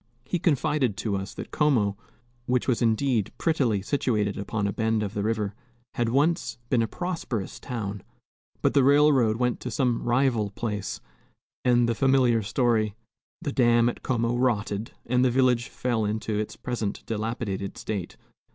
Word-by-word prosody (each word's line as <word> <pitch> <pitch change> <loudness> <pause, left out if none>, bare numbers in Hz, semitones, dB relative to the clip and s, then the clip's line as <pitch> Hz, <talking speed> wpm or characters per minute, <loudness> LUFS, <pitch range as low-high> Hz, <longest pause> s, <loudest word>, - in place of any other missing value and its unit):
He 175 +6 -1
confided 145 - +1
to 105 -1 -1
us 95 +1 -5
that - - -7
Como 120 -10 +2 0.5
which 125 0 +1
was 125 -4 +1
indeed 115 -1 +1
prettily 125 - +1
situated 105 -6 0
upon 100 +1 -2
a 100 - -1
bend 110 -1 0
of 100 -1 -4
the 105 - -2
river 105 -1 -1 0.4
had 120 -1 0
once 140 -3 +1
been 125 -3 +4
a 115 - +1
prosperous 150 - -4
town. 105 -6 -4 0.6
But - - +3
the 140 - +5
railroad 140 -5 +4
went 125 0 0
to 125 - -5
some 120 +1 0
rival 120 -4 +1
place, 105 -1 -4 0.6
and 120 -1 +4
the 115 - +2
familiar 130 -2 +3
story 110 -1 +1 0.5
the 145 - -1
dam 120 -2 +4
at - - -6
Como 115 -2 0
rotted, 110 -4 0 0.2
and 125 +1 +2
the 130 - +4
village 125 -1 +2
fell 120 -3 -1
into 110 +1 -2
its 105 0 -2
present 115 -5 -4
dilapidated 110 -3 -3
state. 100 -5 -4
115 Hz, 160 wpm, -26 LUFS, 105-130 Hz, 0.6 s, the